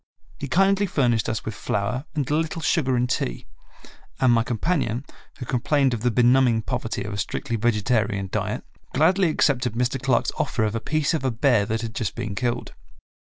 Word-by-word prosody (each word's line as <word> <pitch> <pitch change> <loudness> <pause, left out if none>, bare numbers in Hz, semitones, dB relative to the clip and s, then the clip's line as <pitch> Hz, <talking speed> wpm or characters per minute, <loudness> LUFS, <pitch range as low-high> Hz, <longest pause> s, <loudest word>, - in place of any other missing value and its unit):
He 140 - -4
kindly 195 +6 +3
furnished 120 -9 +1
us 110 - -3
with 110 - -3
flour 105 +5 -2
and 145 -4 -1
a 145 - -1
little 160 +1 -2
sugar 135 -4 +2
and 125 0 +1
tea, - - -2 0.7
and 125 -2 +4
my 115 - +4
companion, 125 +1 -1 0.3
who 125 - -6
complained 130 +2 +1
of 115 - -3
the 125 - +2
be 120 +1 +2
numbing 120 -2 +4
poverty 115 -1 -3
of 105 0 -5
a 100 - -4
strictly 115 +3 -3
vegetarian 105 -3 0
diet, - - -2 0.3
gladly 180 +5 +4
accepted 130 -6 +1
Mr. 125 +2 -1
Clark's 130 -3 +1
offer 110 - 0
of 105 -1 0
a 115 - -1
piece 155 +6 0
of 160 - -1
a 130 - +2
bear 120 -3 +2
that 110 0 -1
had 115 -1 -5
just 110 -4 -3
been 105 - -4
killed. 120 +4 -2
125 Hz, 195 wpm, -24 LUFS, 115-140 Hz, 0.7 s, and